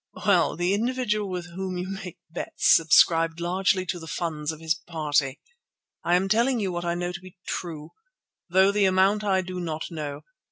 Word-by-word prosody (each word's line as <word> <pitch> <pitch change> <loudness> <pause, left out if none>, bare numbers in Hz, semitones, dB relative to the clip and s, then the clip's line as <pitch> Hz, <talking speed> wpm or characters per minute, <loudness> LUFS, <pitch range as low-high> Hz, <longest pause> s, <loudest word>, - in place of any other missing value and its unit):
"Well, - - +3
the 175 +2 +1
individual 215 -2 0
with 175 -1 -5
whom 185 +1 -4
you 180 +1 -3
make 190 -2 -7
bets 170 - +2
subscribed 165 +1 +4
largely 185 +2 +1
to 175 0 -3
the 160 - -10
funds 155 -2 -3
of 160 - -9
his 160 0 +1
party. 155 -5 -1 0.6
I 175 - +3
am 185 +2 +2
telling 235 +5 +2
you 195 -3 -1
what 175 0 -4
I 170 0 0
know 175 0 -2
to 180 - -7
be 185 -1 -14
true, 160 -3 -5 0.6
though 190 +3 +5
the 205 -1 +2
amount 190 +3 +3
I 190 -2 +2
do 185 0 -6
not 160 -1 -4
know. 150 -3 -5
180 Hz, 190 wpm, -25 LUFS, 165-190 Hz, 0.6 s, though